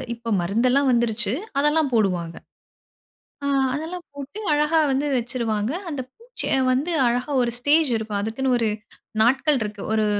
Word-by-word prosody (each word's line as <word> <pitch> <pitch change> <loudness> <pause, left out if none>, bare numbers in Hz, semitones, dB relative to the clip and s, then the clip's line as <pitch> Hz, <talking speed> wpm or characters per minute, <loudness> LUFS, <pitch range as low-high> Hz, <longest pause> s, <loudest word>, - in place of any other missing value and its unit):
இப்போ 230 0 -7
மருந்து 210 +8 +1
எல்லாம் 275 0 +3
வந்திருச்சு, 235 -2 +1 0.3
அதெல்லாம் 295 0 +2
போடுவாங்க. 180 -6 0 1.1
ஆ - - 0 0.3
அதெல்லாம் 335 +4 -5
போட்டு 285 +8 -8
அழகா 300 +2 +2
வந்து 275 +2 0
வச்சுருவாங்க. 230 -3 -2 0.2
அந்த 285 -4 -3
பூச்சிய 475 - -3 0.2
வந்து 285 +7 -1 0.2
அழகா 245 +4 -1
ஒரு 235 - -1
ஸ்டேஜ் 295 +3 +3
இருக்கும். 215 -2 -3
அதுக்குன்னு 250 +5 0
ஒரு, 225 -2 +1 0.5
நாட்கள் 270 +5 +3
இருக்கு, 210 -1 -4
ஒரு 220 -1 +2
250 Hz, 140 wpm, -23 LUFS, 220-295 Hz, 1.1 s, எல்லாம்